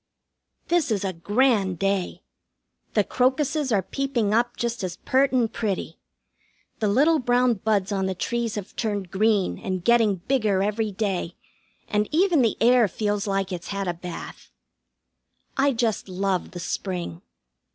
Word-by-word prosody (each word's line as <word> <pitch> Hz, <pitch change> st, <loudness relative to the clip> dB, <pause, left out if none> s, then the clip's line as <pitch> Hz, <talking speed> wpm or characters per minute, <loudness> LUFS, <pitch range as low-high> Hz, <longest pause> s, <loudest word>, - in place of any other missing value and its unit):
This 340 Hz, -5 st, +2 dB
is 205 Hz, -3 st, 0 dB
a 190 Hz, -, -2 dB
grand 205 Hz, +1 st, +1 dB
day. 195 Hz, -1 st, -1 dB, 0.7 s
The 210 Hz, -, +4 dB
crocuses 265 Hz, +4 st, +1 dB
are 200 Hz, -4 st, +2 dB
peeping 245 Hz, -4 st, -1 dB
up 240 Hz, +2 st, +1 dB
just 235 Hz, -2 st, -2 dB
as 180 Hz, -1 st, -4 dB
pert 270 Hz, +1 st, +2 dB
and 245 Hz, -4 st, +1 dB
pretty. 195 Hz, -6 st, -3 dB, 0.8 s
The 215 Hz, -, +1 dB
little 295 Hz, +10 st, +4 dB
brown 245 Hz, 0 st, +3 dB
buds 210 Hz, -3 st, +1 dB
on 190 Hz, -1 st, 0 dB
the 190 Hz, -, -2 dB
trees 235 Hz, +3 st, -2 dB
have 205 Hz, -3 st, -7 dB
turned 205 Hz, -5 st, -2 dB
green 205 Hz, -1 st, +1 dB
and 185 Hz, -2 st, -3 dB
getting 230 Hz, -4 st, +4 dB
bigger 205 Hz, -1 st, +1 dB
every 210 Hz, +1 st, -1 dB
day, 190 Hz, -4 st, -2 dB, 0.5 s
and 210 Hz, 0 st, 0 dB
even 340 Hz, -1 st, +3 dB
the 230 Hz, -3 st, +1 dB
air 240 Hz, -1 st, +5 dB
feels 205 Hz, +1 st, -2 dB
like 195 Hz, -1 st, -1 dB
it's 175 Hz, -2 st, -5 dB
had 200 Hz, -1 st, -3 dB
a 175 Hz, -, 0 dB
bath. 175 Hz, 0 st, -8 dB, 1.1 s
I 275 Hz, +1 st, +3 dB
just 225 Hz, -5 st, -1 dB
love 185 Hz, 0 st, -1 dB
the 180 Hz, -, -8 dB
spring. 175 Hz, -1 st, -4 dB
210 Hz, 150 wpm, -24 LUFS, 190-245 Hz, 1.1 s, air